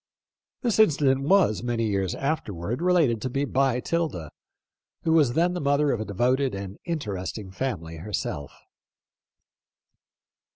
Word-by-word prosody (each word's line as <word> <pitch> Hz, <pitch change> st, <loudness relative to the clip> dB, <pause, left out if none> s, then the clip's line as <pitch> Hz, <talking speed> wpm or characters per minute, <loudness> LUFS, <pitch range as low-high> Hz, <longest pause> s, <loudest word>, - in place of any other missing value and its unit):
This 235 Hz, -3 st, +1 dB
incident 140 Hz, -9 st, +4 dB
was, 190 Hz, -, +4 dB
many 120 Hz, -1 st, -1 dB
years 100 Hz, -4 st, -1 dB
afterward, 120 Hz, -, -3 dB
related 165 Hz, -11 st, +3 dB
to 130 Hz, -, -2 dB
me 140 Hz, +3 st, -1 dB
by 135 Hz, -2 st, +1 dB
'Tilda, 150 Hz, -, -2 dB, 0.7 s
who 160 Hz, -, +2 dB
was 145 Hz, -7 st, +4 dB
then 175 Hz, +4 st, +2 dB
the 180 Hz, -, -3 dB
mother 145 Hz, 0 st, +2 dB
of 115 Hz, -, -1 dB
a -, -, -3 dB
devoted 125 Hz, +5 st, +1 dB
and 100 Hz, 0 st, -7 dB
interesting 105 Hz, -, -4 dB
family 90 Hz, -8 st, -4 dB
herself. 80 Hz, -6 st, -4 dB
125 Hz, 130 wpm, -26 LUFS, 100-150 Hz, 0.7 s, incident